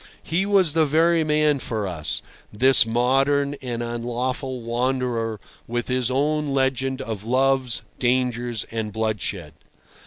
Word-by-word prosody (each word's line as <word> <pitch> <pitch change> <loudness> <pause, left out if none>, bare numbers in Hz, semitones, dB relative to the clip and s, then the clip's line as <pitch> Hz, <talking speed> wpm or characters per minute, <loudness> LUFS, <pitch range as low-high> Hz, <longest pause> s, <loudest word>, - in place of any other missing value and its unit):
He 180 +4 0
was 190 -6 +3
the 160 -1 +3
very 165 +2 +3
man 150 -2 +2
for 110 -4 -3
us, 85 -5 -2 0.3
this 130 +1 +5
modern 135 +4 +2
and 120 -2 -3
unlawful 120 +2 -3
wanderer 120 -2 -1 0.3
with 120 +1 -3
his 125 -1 +1
own 150 +3 0
legend 135 -1 0
of 110 -3 -5
loves, 130 0 +1 0.2
dangers, 120 -2 0
and 110 -2 -3
bloodshed. 105 -6 -3
125 Hz, 125 wpm, -23 LUFS, 115-140 Hz, 0.3 s, this